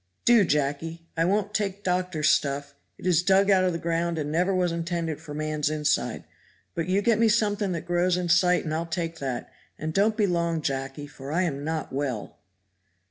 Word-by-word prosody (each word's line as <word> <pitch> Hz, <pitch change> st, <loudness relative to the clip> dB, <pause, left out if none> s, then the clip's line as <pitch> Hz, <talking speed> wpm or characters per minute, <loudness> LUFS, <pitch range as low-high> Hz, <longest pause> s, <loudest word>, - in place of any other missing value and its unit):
"Do, 235 Hz, -3 st, +6 dB
Jacky. 150 Hz, +2 st, -1 dB
I 165 Hz, 0 st, +2 dB
won't 205 Hz, +2 st, 0 dB
take 200 Hz, -1 st, -2 dB
doctor's 180 Hz, -4 st, 0 dB
stuff; 140 Hz, 0 st, 0 dB, 0.2 s
it -, -, -11 dB
is 175 Hz, -3 st, +4 dB
dug 195 Hz, +2 st, +4 dB
out 190 Hz, -1 st, +5 dB
of 180 Hz, -, +2 dB
the 165 Hz, -, -2 dB
ground 170 Hz, 0 st, -1 dB
and 150 Hz, -1 st, -2 dB
never 180 Hz, +4 st, +2 dB
was 180 Hz, -2 st, +1 dB
intended 165 Hz, -2 st, -3 dB
for 145 Hz, -, -8 dB
man's 155 Hz, -1 st, -1 dB
inside. 150 Hz, -1 st, 0 dB, 0.5 s
But 165 Hz, 0 st, -2 dB
you 195 Hz, +2 st, +1 dB
get 230 Hz, -1 st, +3 dB
me 230 Hz, -1 st, +4 dB
something 205 Hz, -3 st, +1 dB
that 170 Hz, -, -4 dB
grows 175 Hz, +1 st, +2 dB
in 180 Hz, -1 st, -2 dB
sight 180 Hz, +1 st, +4 dB
and 155 Hz, -, -2 dB
I'll 165 Hz, +1 st, -2 dB
take 165 Hz, -1 st, -3 dB
that; 130 Hz, -3 st, -4 dB, 0.3 s
and 155 Hz, 0 st, -4 dB
don't 215 Hz, +4 st, +2 dB
be 210 Hz, -, +3 dB
long, 170 Hz, -3 st, 0 dB
Jacky 135 Hz, +1 st, -3 dB
for 140 Hz, -1 st, -9 dB
I 175 Hz, +4 st, +2 dB
am 140 Hz, -5 st, -2 dB
not 155 Hz, -2 st, -3 dB
well." 130 Hz, -6 st, -3 dB
170 Hz, 200 wpm, -26 LUFS, 150-185 Hz, 0.5 s, Do